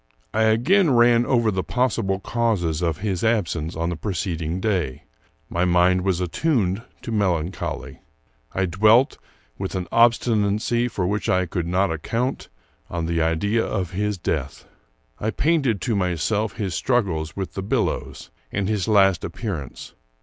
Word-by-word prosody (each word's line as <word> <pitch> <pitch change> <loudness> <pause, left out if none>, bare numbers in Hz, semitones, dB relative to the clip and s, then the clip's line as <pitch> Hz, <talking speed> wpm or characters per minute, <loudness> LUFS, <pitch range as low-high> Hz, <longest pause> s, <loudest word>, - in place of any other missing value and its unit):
I 110 0 +3
again 155 - +4
ran 120 0 +5
over 120 -4 +2
the 95 -1 -1
possible 100 -5 0
causes 100 -9 0
of 85 0 -1
his 95 -4 -1
absence 90 -8 0
on 85 +1 -1
the 85 - -2
preceding 85 -2 -3
day. 90 - -1 0.4
My 85 - -1
mind 90 +1 +3
was 90 -2 0
attuned 100 - 0 0.2
to - - -5
melancholy. 90 -5 -2 0.5
I 95 - 0
dwelt, 110 - +4 0.4
with 95 0 -4
an 90 -2 -3
obstinacy 115 0 +2
for 100 -6 -2
which 105 +3 -1
I 90 0 +2
could 85 -1 -3
not 95 +2 +1
account, 115 - -2 0.4
on 85 -1 -3
the 85 0 0
idea 100 +8 +1
of 95 -4 -2
his 105 +1 -1
death. 70 -5 -3 0.5
I 110 - -1
painted 135 - +1
to 115 - 0
myself 100 +3 0
his 100 -5 -3
struggles 85 -9 0
with 95 -4 -4
the 95 - -4
billows, 95 - -2 0.2
and 100 -1 -1
his 105 -2 -1
last 95 -5 +4
appearance. 85 - -6
95 Hz, 150 wpm, -23 LUFS, 85-110 Hz, 0.5 s, ran